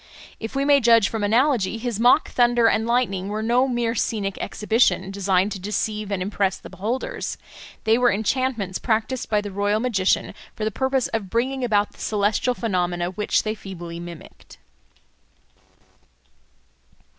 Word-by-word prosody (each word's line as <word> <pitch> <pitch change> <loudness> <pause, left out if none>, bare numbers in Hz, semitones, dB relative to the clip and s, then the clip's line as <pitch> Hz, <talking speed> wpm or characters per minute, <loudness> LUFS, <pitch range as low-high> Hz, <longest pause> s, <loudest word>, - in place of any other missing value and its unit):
If 225 +3 -6
we 275 0 +1
may 285 -1 +5
judge 230 -3 +5
from 220 -2 -3
analogy, 230 -1 +2
his 230 -2 -3
mock 245 +6 +4
thunder 240 -1 +3
and 225 0 +2
lightning 230 -6 0
were 215 +1 -3
no 245 +4 +3
mere 240 -2 0
scenic 200 -3 -1
exhibition 210 -3 +1
designed 195 0 +1
to 195 - -5
deceive 210 +1 -3
and 190 -2 -1
impress 195 -1 -1
the - - -12
beholders; 230 - -3 0.5
they 220 +2 +3
were 245 -1 +4
enchantments 220 -2 -1
practised 230 +2 -1
by 210 -1 +2
the 205 -1 -6
royal 205 +2 0
magician 215 -6 +1 0.2
for 215 - -3
the 220 - 0
purpose 265 +2 0
of 220 -4 -3
bringing 255 +5 -1
about 210 -4 +1
the - - -21
celestial 215 +4 0
phenomena 180 -5 -1
which 210 +3 0
they 215 - -1
feebly 175 -5 -8
mimicked. 170 -2 -11
215 Hz, 155 wpm, -23 LUFS, 195-240 Hz, 0.5 s, may